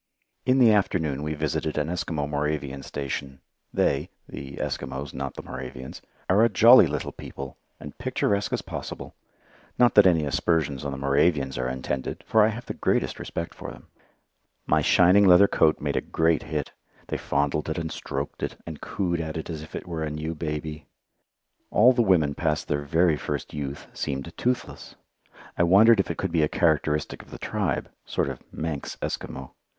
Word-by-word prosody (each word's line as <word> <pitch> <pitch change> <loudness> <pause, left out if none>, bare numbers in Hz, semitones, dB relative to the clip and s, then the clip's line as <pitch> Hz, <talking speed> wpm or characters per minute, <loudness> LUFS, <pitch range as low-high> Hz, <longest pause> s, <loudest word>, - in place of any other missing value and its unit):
In 130 +1 +4
the 120 -4 +7
afternoon 80 -8 +1
we 75 +1 -3
visited 75 +1 -2
an 75 0 0
Eskimo 80 -4 -2
Moravian 75 -2 -2
station. 70 -1 -5 0.3
They 70 +5 +1 0.2
the 70 0 -8
Eskimos, 70 +1 -4
not 70 0 -5
the - - -7
Moravians 65 0 -8 0.3
are 100 +5 +4
a 115 - +5
jolly 115 -1 +8
little 75 0 -3
people, 70 -1 -9 0.2
and 75 - -9
picturesque 105 -5 0
as - - -1
possible. - - -7 0.6
Not 120 -1 +5
that 105 -2 +7
any 80 -4 +3
aspersions 70 -1 0
on 70 - -3
the 70 - -5
Moravians 70 0 +2
are 65 0 -1
intended, 65 +1 -4
for 110 - +4
I 105 - +6
have 115 +2 -4
the - - -4
greatest - - 0
respect 85 - -5
for - - -8
them. - - -13 0.8
My - - +3
shining 90 +3 +5
leather 90 +2 +8
coat 80 -4 +3
made - - -2
a - - +1
great 80 0 +1
hit. 75 -3 -4 0.4
They - - -1
fondled 70 +2 -1
it 80 - -2
and 80 -1 -3
stroked 70 +1 -5
it, - - -3
and 80 -3 -8
coo 90 -3 -2
ed 85 - 0
at 80 -1 -4
it 80 - -5
as 80 -2 -5
if 80 - -10
it - - -5
were 85 -2 -4
a 80 - -1
new 75 +2 -4
baby. 75 -1 -5 0.8
All 125 +5 +6
the 120 - +2
women 85 -9 +3
past 75 0 -1
their 75 -1 0
very 80 +2 +2
first - - -4
youth 70 -1 -5
seemed 70 +5 -4
toothless. 125 +1 -3 0.6
I - - +5
wondered 100 +6 +6
if 95 - +1
it - - -3
could - - -2
be 80 - +2
a 75 - +2
characteristic 75 -3 +1
of - - -18
the - - -8
tribe 100 -10 -2 0.2
sort - - -1
of - - -7
Manx 80 -3 -4
Eskimo. 65 -1 -5
75 Hz, 185 wpm, -26 LUFS, 70-90 Hz, 0.8 s, jolly